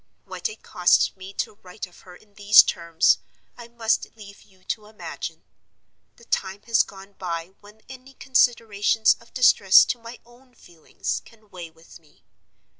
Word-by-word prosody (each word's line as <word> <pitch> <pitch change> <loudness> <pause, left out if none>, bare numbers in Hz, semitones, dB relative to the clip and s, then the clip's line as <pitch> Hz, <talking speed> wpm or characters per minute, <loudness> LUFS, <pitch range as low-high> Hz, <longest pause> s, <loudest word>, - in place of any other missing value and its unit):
What 470 - -4
it 435 - -13
costs - - +2
me 190 0 -11
to 205 - -5
write 185 +3 -8
of 180 - -20
her 180 -1 -15
in 205 +2 -23
these 205 +1 +7
terms, 170 0 +1 0.4
I 240 -1 -12
must 235 -1 -1
leave 200 -2 -13
you 190 -2 -25
to 210 +2 -5
imagine. 215 0 -8 0.7
The 235 - -20
time 195 0 -3
has 230 -1 +3
gone 195 0 -9
by 170 -2 -4
when 210 +1 -18
any 265 +1 -13
consideration 230 -5 +1 0.2
of 230 - -21
distress 200 -7 +6
to 245 - -3
my 230 +1 -11
own 245 +1 -23
feelings 170 -7 -6
can 215 -3 -22
weigh 175 -2 -9
with 165 +1 -18
me. 155 -2 -28
210 Hz, 165 wpm, -23 LUFS, 185-235 Hz, 0.7 s, these